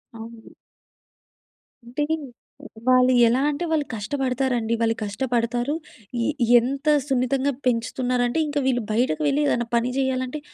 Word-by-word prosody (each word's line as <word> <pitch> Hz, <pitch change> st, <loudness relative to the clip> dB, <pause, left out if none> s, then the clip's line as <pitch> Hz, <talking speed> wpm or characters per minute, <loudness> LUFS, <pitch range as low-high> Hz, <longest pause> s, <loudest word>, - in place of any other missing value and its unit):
అవును. 225 Hz, 0 st, -11 dB, 1.3 s
అంటే, 250 Hz, +5 st, -3 dB, 0.8 s
వాళ్ళు 255 Hz, 0 st, +5 dB
ఎలా 240 Hz, +3 st, +2 dB
అంటే 300 Hz, +4 st, -2 dB
వాళ్ళు 305 Hz, -2 st, +1 dB
కష్టపడతారండి. 250 Hz, 0 st, -1 dB
వాళ్ళు 225 Hz, -1 st, +1 dB
కష్టపడతారు. 240 Hz, +4 st, -1 dB, 0.5 s
ఎ -, -, 0 dB, 0.3 s
ఎంత 275 Hz, +5 st, -4 dB, 0.2 s
సున్నితంగా 270 Hz, 0 st, 0 dB
పెంచుతున్నారంటే, 245 Hz, +2 st, 0 dB
ఇంక 290 Hz, 0 st, -3 dB
వీళ్ళు 250 Hz, -2 st, +1 dB
బయటకు 250 Hz, +8 st, 0 dB
వెళ్ళి 285 Hz, +1 st, +1 dB
ఏదైనా 240 Hz, -4 st, 0 dB
పని 235 Hz, +1 st, +1 dB
చేయాలంటే, 260 Hz, +1 st, -1 dB
250 Hz, 115 wpm, -23 LUFS, 235-270 Hz, 1.3 s, వాళ్ళు